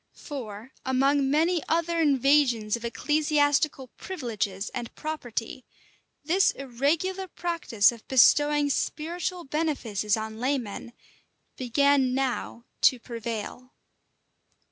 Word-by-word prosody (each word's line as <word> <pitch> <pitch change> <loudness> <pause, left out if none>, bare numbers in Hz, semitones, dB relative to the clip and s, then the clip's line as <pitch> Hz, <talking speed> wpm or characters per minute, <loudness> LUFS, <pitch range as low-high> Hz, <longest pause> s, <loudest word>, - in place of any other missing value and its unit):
For, 235 -4 -8
among 270 +1 +2
many 325 +4 +2
other 335 0 +1
invasions 275 -6 +3
of 235 - -8
ecclesiastical 290 +1 +1
privileges 220 - -4
and 240 -2 -6
property, 255 -4 -5 0.6
this 355 +6 +3
irregular 300 +9 -1
practice 335 - +1
of 230 -2 -13
bestowing 290 +2 +4
spiritual 345 +5 -2
benefices 260 - -1
on 220 0 -6
laymen 245 -3 -3 0.6
began 265 +1 +2
now 255 -3 -2 0.2
to 255 - +5
prevail. 235 +2 -6
270 Hz, 95 wpm, -26 LUFS, 235-305 Hz, 0.6 s, to